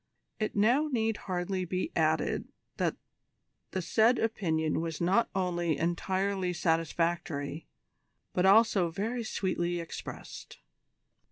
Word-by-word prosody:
It 215 - -2
now 240 +9 +4
need 225 -3 +1
hardly 185 +1 -1
be 185 - -2
added - - +1 0.3
that - - 0 0.7
the 185 - -3
said 225 +7 +4
opinion 160 -9 0
was 165 -2 -4
not 190 +7 +2
only 175 -4 0
entirely 185 +3 0
satisfactory, 165 -2 -1 0.7
but 180 +1 +3
also 200 -3 +5
very 225 +8 -2
sweetly 175 -4 -1
expressed. 165 - -8
185 Hz, 105 wpm, -30 LUFS, 170-215 Hz, 0.7 s, also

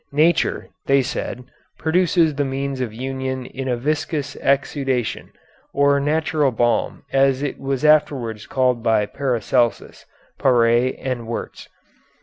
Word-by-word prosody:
Nature, 160 +4 +2 0.2
they 135 -1 +4
said, 125 -1 -4 0.3
produces 170 -1 +2
the 145 0 -1
means 135 0 -3
of 120 -4 -2
union 130 +2 -4
in 135 +1 -6
a 125 -2 0
viscous 150 +1 -2
exudation, 135 -3 -1 0.4
or 140 0 +4
natural 150 0 +1
balm, 120 -1 0
as 135 0 +3
it 145 - -3
was 135 +1 -2
afterwards 135 -8 +2
called 125 -2 +1
by 110 -2 +2
Paracelsus, 120 -1 -1 0.3
Paré, 120 0 +3
and 125 -3 -4
Wurtz. 115 - -6
135 Hz, 125 wpm, -21 LUFS, 125-145 Hz, 0.4 s, they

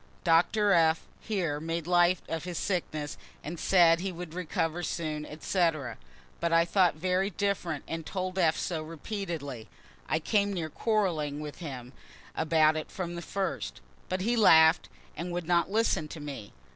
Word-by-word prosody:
Doctor 185 +5 +3
F. 165 -2 +4 0.2
here 175 -9 -2
made 165 +1 -3
light 175 +1 +4
of 165 -1 -3
his 180 -2 -4
sickness 155 -6 -2 0.4
said 170 -2 +5
he 190 +1 -2
would 175 -2 -8
recover 170 -1 -2
soon, 155 -2 -3
etc.; 155 - -1 0.4
but 170 0 0
I 165 0 +5
thought 180 -1 +3
very 185 +4 0
different, 180 -5 -2
and 165 0 -4
told 185 +2 -3
F. 160 -3 +3
so 165 -3 -2
repeatedly; 160 - -5 0.4
(I - - +2
came 200 +5 +1
near 165 -4 -3
quarreling 170 -11 0
with 150 -1 -7
him 130 -6 -7 0.4
about 155 -1 +3
it 155 - -4
from 175 -2 -5
the 170 - -5
first) 195 +2 -3 0.3
but 185 0 -1
he 235 +5 +1
laugh'd, 160 -7 +6 0.3
and 175 +2 -4
would 175 -1 -3
not 175 0 +2
listen 200 -6 +1
to 155 - -8
me. 140 -8 -7
170 Hz, 160 wpm, -29 LUFS, 155-185 Hz, 0.4 s, laugh'd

